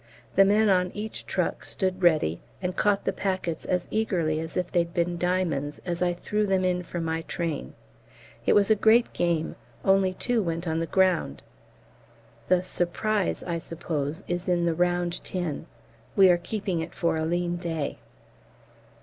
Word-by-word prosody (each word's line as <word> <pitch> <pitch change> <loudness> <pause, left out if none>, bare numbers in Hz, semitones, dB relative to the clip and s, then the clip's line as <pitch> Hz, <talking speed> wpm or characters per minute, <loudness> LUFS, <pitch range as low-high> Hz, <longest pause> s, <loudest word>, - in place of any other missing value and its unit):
The 195 - +7
men 210 +2 +4
on 180 -2 +3
each 215 +1 -5
truck - - -1
stood 185 -1 -2
ready, 155 - +3 0.2
and 180 -1 -3
caught 205 -1 +2
the 195 - +1
packets 185 -4 -2
as 180 -1 0
eagerly 175 -8 0
as 160 0 -5
if 180 -1 -1
they'd 170 0 0
been 175 0 +1
diamonds 170 -6 0
as 175 -1 -2
I 180 -1 +3
threw 210 +4 -1
them 190 -1 +2
in 180 -1 +1
from 175 -1 -4
my 160 0 -1
train. 165 - -4 0.7
It - - +3
was 205 +1 +4
a - - +7
great 225 +3 +4
game; 170 -2 0 0.3
only 195 -1 +3
two 245 +2 +1
went 170 -1 -3
on 160 0 0
the 165 - -2
ground. 185 - +1 1.0
The 185 -1 +3
"Surprise," 185 +3 -1
I 170 -2 -2
suppose, 160 0 -4
is 175 +1 -2
in 175 -1 +2
the 170 - +2
round 175 0 0
tin. 175 -6 -3 0.5
We 190 -2 +7
are 175 - +4
keeping 190 -1 -3
it 165 +1 -5
for 170 - +1
a 160 - -1
lean 175 +1 0
day. 165 -4 -3
175 Hz, 170 wpm, -26 LUFS, 165-190 Hz, 1.0 s, The